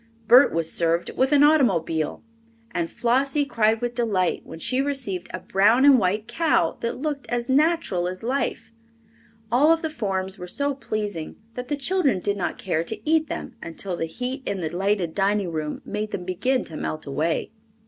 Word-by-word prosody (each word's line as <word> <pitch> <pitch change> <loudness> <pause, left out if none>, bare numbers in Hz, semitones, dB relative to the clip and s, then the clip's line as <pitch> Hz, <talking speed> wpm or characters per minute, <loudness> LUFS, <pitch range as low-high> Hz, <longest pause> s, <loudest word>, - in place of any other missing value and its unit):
Bert 250 +5 +7
was 165 -1 0
served 170 0 0
with 260 +2 +1
an 290 -1 +6
automobile, 195 - +2 0.5
and 170 -2 -2
Flossie 270 +4 +1
cried 225 -4 +1
with 240 0 -2
delight 205 -7 0
when - - -10
she 255 +10 +1
received 250 -11 -3
a - - -4
brown 215 +7 +3
and 275 -3 +7
white 210 +3 0
cow 240 - +1
that 235 - -3
looked 290 0 -3
as 240 0 -1
natural 285 - +2
as 185 +3 -6
life. 260 +1 -2 0.8
All 285 +7 +5
of 330 0 +2
the 320 - -2
forms 195 -6 -3
were 180 - -7
so 285 +8 0
pleasing 210 - -4 0.2
that 250 +1 -6
the 290 - -1
children 290 - +1
did 200 +2 -1
not 185 -3 -3
care 165 -4 -1
to 215 - -5
eat 315 0 +3
them - - -5
until 175 +2 -4
the 165 - -3
heat 250 - -4
in 200 - -1
the 165 -4 -2
lighted 190 -3 0
dining 200 -2 +1
room 155 -2 -4
made 210 +1 -3
them 180 - -5
begin 245 +8 0
to 160 - -8
melt 155 0 -4
away. 155 +7 -1
215 Hz, 185 wpm, -24 LUFS, 180-270 Hz, 0.8 s, Bert